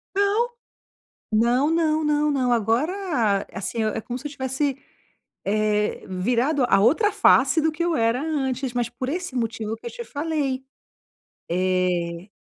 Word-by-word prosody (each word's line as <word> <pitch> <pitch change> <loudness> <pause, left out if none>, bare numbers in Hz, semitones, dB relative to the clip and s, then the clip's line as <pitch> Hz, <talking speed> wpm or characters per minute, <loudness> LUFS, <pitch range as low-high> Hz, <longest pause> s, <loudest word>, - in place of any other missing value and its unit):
Não. 405 +3 +3 0.9
Não, 240 +7 +3
não, 315 -1 +1
não, 300 0 +2
não, 255 -3 +1
agora 235 - +1 0.6
eh, - - -10
assim, 220 +3 -2
é 215 +1 -1
como 245 +3 -5
se 295 - -6
eu - - -10
tivesse, 270 0 -1 0.7
eh, 210 +1 0
virado 245 +9 +1
a - - +5
outra 330 - +4
face 275 +4 +4
do 320 -1 +2
que 330 +2 -3
eu 340 -1 +1
era 230 +2 +1
antes, 265 -5 -2
mas 240 -1 0
por 255 +2 -5
esse 350 -2 -3
motivo 225 -2 -2
que - - -13
eu - - -3
te 475 -1 -7
falei. 285 -5 -2 0.9
Eh 180 0 0
255 Hz, 155 wpm, -24 LUFS, 220-305 Hz, 0.9 s, a